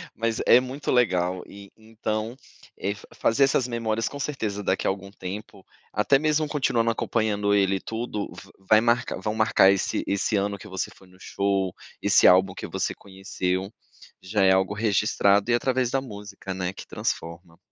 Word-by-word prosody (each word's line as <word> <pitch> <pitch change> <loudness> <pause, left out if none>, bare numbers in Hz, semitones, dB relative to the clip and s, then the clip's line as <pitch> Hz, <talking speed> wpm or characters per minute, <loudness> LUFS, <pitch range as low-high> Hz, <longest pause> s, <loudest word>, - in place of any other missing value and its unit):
Mas 115 0 -1
é 120 - +7
muito 130 +3 -4
legal 90 -7 +2
e 100 0 -13
então, 110 +1 -4 0.4
eh, 100 - -2 0.2
fazer 115 +5 +2
essas 135 -2 +1
memórias 115 -2 -1
com 140 - -8
certeza 110 -8 -3
daqui 95 - 0
a - - +3
algum 95 0 -4
tempo, 100 +1 -8 0.3
até 105 +7 +3
mesmo 155 0 +1
continuando 125 -6 +1
acompanhando 105 -3 0
ele 100 -1 +3
e - - -7
tudo, 110 -2 -4
v - - -13
vai 110 +3 +4
marcar 120 -3 +1
vão 105 +2 -2
marcar 110 -3 +5
esse 100 - -1
esse 100 +2 0
ano 100 0 0
que - - -12
você 95 -1 -4
foi 95 - -19
no 90 0 -20
show, 100 -2 -1 0.3
esse - - +5
álbum 95 +1 +5
que - - -7
você - - -2
conheceu, 95 -1 -4 0.5
já 100 +2 0
é 95 - +6
algo 95 +1 +1
registrado 105 -1 +2
e - - +4
através 125 +1 +1
da 135 +2 0
música, 105 -5 -8
né, 90 0 -3
que - - -10
transforma. 85 0 -4
105 Hz, 175 wpm, -25 LUFS, 95-115 Hz, 0.5 s, é